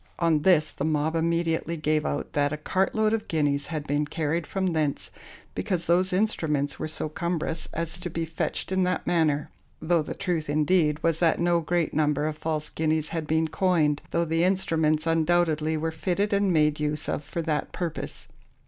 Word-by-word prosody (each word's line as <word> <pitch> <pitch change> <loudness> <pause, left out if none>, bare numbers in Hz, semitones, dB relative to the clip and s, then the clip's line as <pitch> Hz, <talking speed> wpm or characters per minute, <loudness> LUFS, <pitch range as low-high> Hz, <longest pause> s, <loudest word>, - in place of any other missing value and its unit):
On 165 -3 +2
this, 155 -3 +4
the - - -5
mob 155 +1 0
immediately 165 0 0
gave 155 0 0
out 145 - -3
that 145 -1 +1
a 150 - -2
cart 185 +5 0
load 220 0 +2
of 225 -1 -2
guineas 145 -3 0
had 155 -3 -4
been 145 +1 0
carried 160 +2 -2
from 190 -3 -1
thence, 150 -3 -1 0.4
because 180 -5 -2
those 180 +2 +3
instruments 160 -8 0
were - - -2
so 155 - -3
cumberous 165 0 -2
as 165 +1 -3
to 180 0 -4
be 165 0 -3
fetched 165 +3 -3
in 190 0 +2
that 180 0 0
manner; 155 -4 +1 0.3
though 165 +1 +2
the 150 - -5
truth, 165 -5 -2
indeed, 150 +1 +2
was 165 -1 +2
that 165 -2 +3
no 170 0 +3
great 170 0 0
number 150 -1 +1
of 155 -1 -2
false 155 -1 -2
guineas 155 -1 0
had 165 -2 -3
been 160 +1 +2
coined, 155 -3 +1
though 170 0 +1
the 165 +1 +1
instruments 160 -5 +1
undoubtedly 160 -1 +2
were 160 +1 -1
fitted 185 +5 -1
and 200 -1 +2
made 150 -2 +2
use 150 0 -2
of - - -2
for 170 +3 -4
that 155 -2 -1
purpose. 170 -3 -5
160 Hz, 190 wpm, -26 LUFS, 150-175 Hz, 0.4 s, this